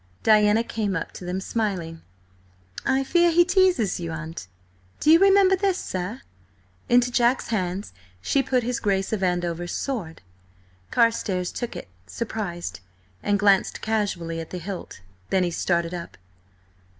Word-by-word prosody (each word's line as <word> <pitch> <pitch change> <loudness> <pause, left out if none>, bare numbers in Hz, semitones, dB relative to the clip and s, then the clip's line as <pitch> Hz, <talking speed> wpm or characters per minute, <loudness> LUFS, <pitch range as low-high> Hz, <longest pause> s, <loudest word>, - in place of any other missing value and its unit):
Diana 215 0 +5
came 210 -4 -2
up 165 - -3
to 180 - -10
them 180 +1 -2
smiling. 185 -6 -3 0.9
"I 265 +1 +2
fear 345 +5 +3
he 345 +1 +5
teases 365 - +2
you, 170 -1 -4
aunt. 160 - -7 0.5
Do 305 - +4
you 330 - +8
remember 390 0 +5
this, 380 -1 0
sir?" 185 - -4 0.7
Into 245 0 +4
Jack's 240 +1 +2
hands 190 - -2 0.3
she 275 - +1
put 255 -2 0
his 245 +1 -1
Grace 195 0 0
of 210 - -1
Andover's 175 -1 -1
sword. 210 - -4 0.7
Carstares 195 - +1
took 240 - -5
it, - - -7 0.2
surprised, 175 - -4 0.4
and 205 - +1
glanced 200 -1 +2
casually 190 -7 -2
at 165 - -7
the 180 - -5
hilt. 180 - -7 0.3
Then 190 - +2
he 175 - -1
started 170 0 0
up. 170 - -7
205 Hz, 145 wpm, -24 LUFS, 175-245 Hz, 0.9 s, you